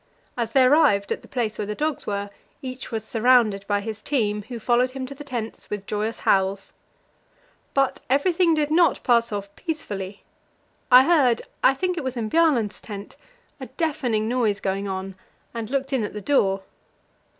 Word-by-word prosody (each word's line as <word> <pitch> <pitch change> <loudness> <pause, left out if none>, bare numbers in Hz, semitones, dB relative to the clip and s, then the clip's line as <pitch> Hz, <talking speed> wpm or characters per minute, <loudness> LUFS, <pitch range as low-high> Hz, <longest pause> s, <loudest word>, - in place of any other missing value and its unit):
As 230 -2 -3
they 265 - +6
arrived 255 -8 +4
at - - -2
the - - -16
place 230 -4 -2
where 205 - -2
the 210 - -3
dogs 305 +1 -2
were, 200 0 -3 0.3
each 255 0 -6
was 225 -3 -3
surrounded 225 -3 +3
by 205 -1 +1
his 215 0 -6
team, 210 -6 0
who 245 - -6
followed 245 +3 +2
him 260 0 -5
to 270 - -7
the 285 +2 -10
tents 240 -5 -6
with 205 -1 -4
joyous 215 +2 -3
howls. 195 0 +1 1.0
But 275 -1 +2
everything 335 +5 +3
did 300 -1 0
not 340 +1 +3
pass 235 -2 +3
off 200 -1 -5
peacefully; 205 - -5 0.7
I 250 +1 +10
heard 270 -7 +3 0.2
I 270 - +5
think 360 +3 -1
it - - -5
was 260 -1 -4
in 220 -2 -3
Bjaaland's 285 -11 +2
tent 205 -2 -8 0.4
a - - -7
deafening 250 -10 -1
noise 225 -4 +1
going 195 +1 -2
on, 190 0 -4 0.4
and 230 -2 -5
looked 270 0 -2
in 255 -4 +1
at 210 - -4
the 210 - -5
door. 195 -6 +1
235 Hz, 180 wpm, -24 LUFS, 205-275 Hz, 1.0 s, I